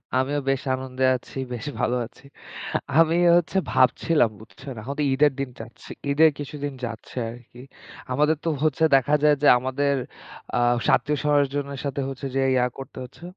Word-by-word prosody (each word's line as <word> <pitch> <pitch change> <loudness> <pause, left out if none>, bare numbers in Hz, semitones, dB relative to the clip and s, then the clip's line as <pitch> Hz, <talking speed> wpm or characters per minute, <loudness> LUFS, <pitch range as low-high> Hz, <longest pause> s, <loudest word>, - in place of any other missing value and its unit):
আমিও 135 +3 +1
বেশ 135 -1 0
আনন্দে 130 0 -4
আছি, 125 - -9 0.2
বেশ 120 +2 -6
ভালো 120 - +1
আছি। 130 +3 -18 0.7
আমিও 170 +2 +4
হচ্ছে 175 +2 -1
ভাবছিলাম 130 +1 +3
বুঝছেন। 130 +5 -10
এখন 130 +6 -5
তো - - +2
ঈদের 145 +2 +4
দিন 135 -1 -2
যাচ্ছে। 120 - -11 0.2
ঈদের 160 +3 +6
কিছুদিন 145 0 -5
যাচ্ছে 115 +2 -9
আরকি। 120 0 -14 0.5
আমাদের 150 +4 +2
তো - - +2
হচ্ছে 155 0 +1
দেখা 135 +3 +3
যায় 150 -1 +5
যে, - - +5
আমাদের 135 +3 0 0.6
আ - - +2 0.4
আত্মীয়-স্বজনের 145 -1 0
সাথে 140 0 -3 0.4
যে 135 - +2
ইয়া 125 -1 +3
করতে 135 - -10
হচ্ছে। 125 +6 -13
140 Hz, 155 wpm, -24 LUFS, 130-150 Hz, 0.7 s, ঈদের